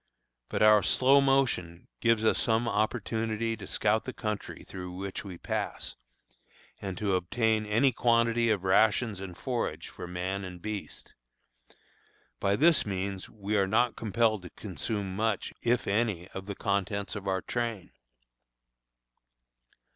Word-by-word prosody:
But - - +1
our 105 -1 +7
slow 135 +6 +5
motion 125 -11 +1
gives 115 -2 +2
us - - +3
some 115 0 +2
opportunity 110 +1 -1
to 100 -4 -9
scout 110 +1 +1
the 130 - -5
country 105 -3 -4
through 90 -1 -7
which 95 +1 -5
we 95 -4 -8
pass, - - -3 0.9
and 95 -3 -4
to 100 -1 0
obtain 110 +4 +1
any 115 +6 +3
quantity 115 0 +2
of 105 -4 +1
rations 105 +2 +3
and 95 -3 -7
forage 125 -3 -3
for - - -8
man 90 +2 -3
and 90 -1 -7
beast. 105 +2 -6 1.3
By 100 0 +2
this 160 +7 +5
means 95 -1 -3
we 105 0 -3
are 100 -2 +3
not 120 +4 +2
compelled 110 -1 +1
to 90 - -9
consume 100 0 -4
much, 110 +2 -1
if 120 +1 +1
any, 100 -4 0
of 95 0 -8
the 100 - -4
contents 100 +1 -1
of 100 -1 -6
our 95 -1 0
train. 115 -5 -3
105 Hz, 140 wpm, -29 LUFS, 95-115 Hz, 1.3 s, our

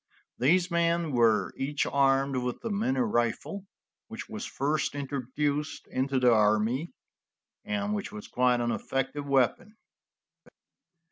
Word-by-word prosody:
These 175 +8 +3
men 170 -1 +1
were 115 -4 +3
each 145 +2 -1
armed 135 -1 +2
with 125 -1 -3
the 230 - -3
minie 135 -11 0
rifle 120 - -1 0.4
which 225 +1 -7
was 215 -1 -6
first 145 +2 -1
introduced 140 +1 -2
into 130 +1 -1
the 125 -2 +5
army, 110 +8 +2 0.7
and 210 -1 -2
which 205 -1 -3
was 210 0 -8
quite 125 -1 +2
an 120 0 0
effective 135 +4 -3
weapon. 140 - +1
140 Hz, 125 wpm, -28 LUFS, 125-170 Hz, 0.7 s, the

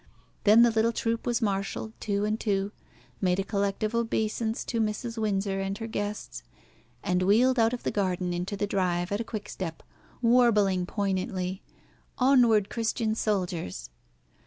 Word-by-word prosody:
Then 215 +3 +8
the 240 - +5
little 225 +1 +2
troop 230 0 -2
was 240 0 +1
marshalled 200 +2 -2
two 205 0 -1
and 215 +1 -1
two, 200 -2 0 0.5
made 180 -2 +2
a - - +1
collective 200 +2 -1
obeisance 225 -1 -1
to 230 -2 -1
Mrs. 220 +2 -2
Windsor 195 -2 0
and 195 +1 -2
her 225 - -5
guests, 210 -2 -4 0.6
and 180 -2 +1
wheeled 235 +7 +4
out 225 0 +4
of 245 - -5
the - - -1
garden 185 -3 -1
into 180 +4 -3
the 205 - 0
drive 180 -3 0
at 205 +2 0
a - - -1
quick 215 -2 -6
step, 165 -4 -6 0.4
warbling 215 -7 +3
poignantly, 190 -2 -2 0.6
"Onward, 245 -6 +4
Christian 225 -1 -1
Soldiers." 175 - -2
205 Hz, 155 wpm, -28 LUFS, 195-225 Hz, 0.6 s, Then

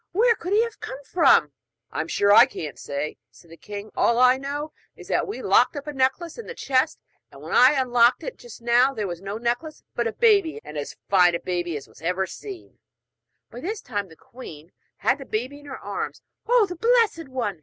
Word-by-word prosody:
Where 460 +5 +4
could 365 -4 -7
he 435 +2 +5
have 465 -1 -6
come - - -6
from?' 265 - +4 0.4
'I'm 160 - -3
sure 200 +4 +3
I 220 - +8
can't 150 -3 -7
say,' 140 +2 -4
said 170 - -20
the - - -10
king; 205 +3 -9
'all 235 - +2
I 250 +1 +6
know 290 +3 -5 0.2
is - - -13
that - - +1
we 410 - -6
locked - - +4
up 285 - -6
a 295 - -5
necklace 275 - -1
in 465 - -8
the 475 - -7
chest, 260 - +1 0.3
and - - -14
when - - -9
I 255 +3 +7
unlocked 245 -3 +3
it - - -5
just 480 - -13
now 245 +3 +3
there 215 -2 -2
was 175 -2 -5
no 200 +2 -5
necklace, 240 +7 -3
but 235 -1 -1
a 225 - -3
baby, 405 -8 +3
and 150 - -10
as 145 -1 -5
fine 180 -3 +4
a - - -2
baby 175 -3 -3
as 140 - -10
ever 180 +3 -1
was 190 - -2
seen.' 395 -4 -10 0.7
By 240 - -9
this 405 - -4
time 205 -2 -4
the 160 - -15
queen 165 -8 -12 0.3
had 260 +2 +1
the 270 - -8
baby 255 +6 -4
in 290 - -15
her 265 - -7
arms. - - -5 0.2
'Oh, 480 -2 +5
the 360 -2 -7
blessed 455 - +2
one!' 230 -9 -3
255 Hz, 220 wpm, -24 LUFS, 200-330 Hz, 0.7 s, I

